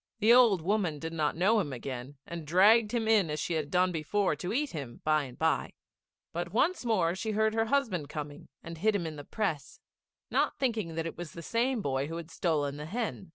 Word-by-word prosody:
The 225 Hz, +2 st, +5 dB
old 230 Hz, -9 st, +5 dB
woman 185 Hz, -5 st, 0 dB
did 160 Hz, +2 st, -6 dB
not 155 Hz, -1 st, 0 dB
know 210 Hz, +6 st, +4 dB
him 155 Hz, -8 st, -2 dB
again, 130 Hz, +2 st, -6 dB
and 170 Hz, -3 st, -7 dB
dragged 210 Hz, +6 st, +5 dB
him 235 Hz, -2 st, -1 dB
in 210 Hz, -7 st, +4 dB
as 150 Hz, 0 st, -2 dB
she 175 Hz, -, -2 dB
had 155 Hz, -3 st, -2 dB
done 180 Hz, +3 st, +2 dB
before 175 Hz, +2 st, 0 dB
to 180 Hz, -, -4 dB
eat 285 Hz, +5 st, 0 dB
him 140 Hz, -7 st, -7 dB
by 155 Hz, -1 st, +2 dB
and 125 Hz, -2 st, -11 dB
by; -, -, 0 dB, 0.6 s
but 175 Hz, +1 st, -3 dB
once 305 Hz, -, +1 dB
more 190 Hz, -8 st, +2 dB
she 215 Hz, +4 st, -3 dB
heard 220 Hz, +1 st, +2 dB
her 225 Hz, 0 st, +1 dB
husband 220 Hz, -, 0 dB
coming 145 Hz, -1 st, -7 dB, 0.2 s
and 165 Hz, -1 st, -8 dB
hid 215 Hz, +3 st, +2 dB
him 180 Hz, -4 st, -1 dB
in 160 Hz, -1 st, -5 dB
the 145 Hz, -, -8 dB
press, 160 Hz, -, -3 dB, 0.5 s
not -, -, +1 dB
thinking 220 Hz, -11 st, -1 dB
that 165 Hz, 0 st, -2 dB
it 165 Hz, -, -6 dB
was 175 Hz, -3 st, -7 dB
the 170 Hz, -, -8 dB
same 235 Hz, +1 st, 0 dB
boy 135 Hz, 0 st, -1 dB
who 165 Hz, +2 st, -5 dB
had 170 Hz, 0 st, -8 dB
stolen 145 Hz, -5 st, -1 dB
the 150 Hz, +1 st, -6 dB
hen. 210 Hz, -2 st, -4 dB
175 Hz, 225 wpm, -30 LUFS, 155-220 Hz, 0.6 s, The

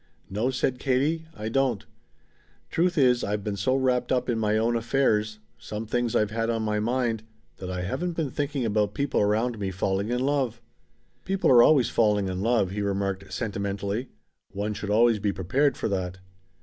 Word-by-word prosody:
"No," 110 Hz, +6 st, 0 dB
said 130 Hz, -1 st, -1 dB
Katie, 145 Hz, +5 st, 0 dB
"I 105 Hz, +1 st, -5 dB
don't. 125 Hz, -2 st, 0 dB, 0.9 s
Truth 175 Hz, +1 st, +1 dB
is 125 Hz, -3 st, +4 dB
I've 105 Hz, 0 st, -2 dB
been 105 Hz, -1 st, -2 dB
so 100 Hz, +7 st, +1 dB
wrapped 130 Hz, -2 st, +1 dB
up 125 Hz, -1 st, +1 dB
in 115 Hz, -2 st, 0 dB
my 105 Hz, -1 st, +1 dB
own 115 Hz, +2 st, +1 dB
affairs 110 Hz, -3 st, +1 dB, 0.2 s
some 105 Hz, +1 st, -6 dB
things 120 Hz, +1 st, -1 dB
I've 105 Hz, -1 st, +2 dB
had 115 Hz, +1 st, -1 dB
on 115 Hz, -1 st, 0 dB
my 105 Hz, -1 st, 0 dB
mind 115 Hz, 0 st, 0 dB, 0.4 s
that 90 Hz, -, -7 dB
I 90 Hz, -1 st, -3 dB
haven't 175 Hz, -, -2 dB
been 160 Hz, -5 st, -2 dB
thinking 145 Hz, -3 st, -2 dB
about 105 Hz, -1 st, 0 dB
people 140 Hz, -1 st, 0 dB
around 110 Hz, +3 st, +1 dB
me 100 Hz, -2 st, -2 dB
falling 95 Hz, +2 st, -1 dB
in 125 Hz, +1 st, 0 dB
love." 130 Hz, -4 st, 0 dB, 0.6 s
"People 190 Hz, -4 st, +1 dB
are 120 Hz, -2 st, +8 dB
always 130 Hz, -3 st, +5 dB
falling 105 Hz, -4 st, +2 dB
in 90 Hz, 0 st, -3 dB
love," 110 Hz, -4 st, +2 dB
he 105 Hz, +1 st, -3 dB
remarked 100 Hz, -1 st, -2 dB
sentimentally. 100 Hz, +1 st, -3 dB, 0.4 s
"One 105 Hz, +2 st, -2 dB
should 100 Hz, 0 st, -5 dB
always 115 Hz, +1 st, +4 dB
be 100 Hz, 0 st, 0 dB
prepared 125 Hz, -, +1 dB
for -, -, -1 dB
that." 95 Hz, -2 st, -2 dB
110 Hz, 185 wpm, -26 LUFS, 100-130 Hz, 0.9 s, are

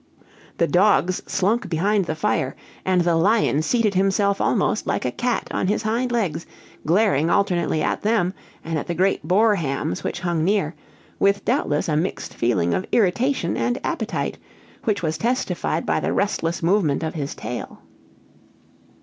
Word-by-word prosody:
The 170 Hz, -, +3 dB
dogs 185 Hz, -1 st, +3 dB
slunk 200 Hz, +2 st, 0 dB
behind 195 Hz, +4 st, +1 dB
the 155 Hz, -, -3 dB
fire, 130 Hz, -3 st, -1 dB, 0.3 s
and 185 Hz, -1 st, +2 dB
the 170 Hz, -1 st, +2 dB
lion 180 Hz, -3 st, +3 dB
seated 215 Hz, +4 st, +1 dB
himself 195 Hz, +1 st, +2 dB
almost -, -, +1 dB
like -, -, -1 dB
a -, -, 0 dB
cat 245 Hz, -1 st, -1 dB
on -, -, -1 dB
his 210 Hz, +2 st, 0 dB
hind 235 Hz, +3 st, 0 dB
legs, 175 Hz, -9 st, -1 dB, 0.4 s
glaring 170 Hz, -4 st, +3 dB
alternately 175 Hz, -5 st, +1 dB
at -, -, -1 dB
them, 205 Hz, -4 st, +1 dB, 0.3 s
and 165 Hz, -1 st, -1 dB
at -, -, -7 dB
the 175 Hz, -, -2 dB
great 190 Hz, +3 st, +1 dB
boar 210 Hz, +5 st, +4 dB
hams 135 Hz, -, -2 dB
which 175 Hz, -, -3 dB
hung 170 Hz, -3 st, 0 dB
near, 190 Hz, -4 st, +1 dB, 0.5 s
with 200 Hz, 0 st, +2 dB
doubtless 230 Hz, -, 0 dB
a 155 Hz, -, 0 dB
mixed 170 Hz, +5 st, -2 dB
feeling 95 Hz, -8 st, +1 dB
of 185 Hz, -, -2 dB
irritation 230 Hz, -1 st, +1 dB
and 120 Hz, +1 st, 0 dB
appetite, 220 Hz, -, -2 dB, 0.5 s
which 205 Hz, -4 st, 0 dB
was 155 Hz, -1 st, -1 dB
testified 245 Hz, +5 st, -1 dB
by -, -, +1 dB
the -, -, -1 dB
restless 170 Hz, -5 st, -1 dB
movement 170 Hz, -5 st, +2 dB
of 160 Hz, -, -2 dB
his 145 Hz, -3 st, -4 dB
tail. 125 Hz, -, -7 dB
185 Hz, 160 wpm, -22 LUFS, 160-210 Hz, 0.5 s, boar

